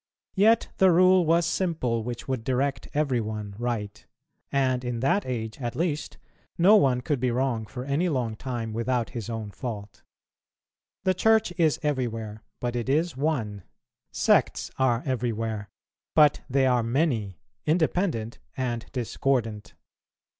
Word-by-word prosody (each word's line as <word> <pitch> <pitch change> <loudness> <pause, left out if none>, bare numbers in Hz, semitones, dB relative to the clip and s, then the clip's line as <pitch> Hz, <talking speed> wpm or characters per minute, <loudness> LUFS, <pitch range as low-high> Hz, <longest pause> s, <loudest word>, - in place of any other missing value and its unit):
Yet 220 +3 +4
the 190 - +6
rule 185 0 +5
was 170 +1 +4
simple, 160 -11 0
which 120 +1 -6
would 130 -4 -2
direct 130 +1 -1
every 140 -5 +1
one 105 -2 -5
right; 110 -4 -3 0.5
and 130 -2 +1
in 120 -1 -3
that 140 +8 +1
age, 115 -1 -4
at 120 -1 -3
least, 160 -2 -2 0.4
no 190 +5 +7
one 130 -11 +3
could 140 +1 -1
be 125 +1 +1
wrong 120 -3 -1
for 125 +2 -7
any 145 +6 +1
long 125 -7 -1
time 115 -2 -4
without 115 +1 -1
his 115 -2 -5
own 110 -3 -4
fault. 105 -4 -7 1.0
The 185 0 +3
Church 220 0 +3
is 160 -4 +2
everywhere, 115 -7 -2 0.2
but 120 0 -2
it 120 +1 -2
is 160 +4 +1
one; 125 -9 -1 0.5
sects - - +2
are 125 -2 +2
everywhere, 115 -5 -2 0.5
but 150 -2 +5
they 135 +1 +3
are 125 -2 +3
many, 115 - 0 0.3
independent 160 - 0 0.2
and 120 -3 -2
discordant. 120 -3 -1
125 Hz, 140 wpm, -26 LUFS, 115-150 Hz, 1.0 s, no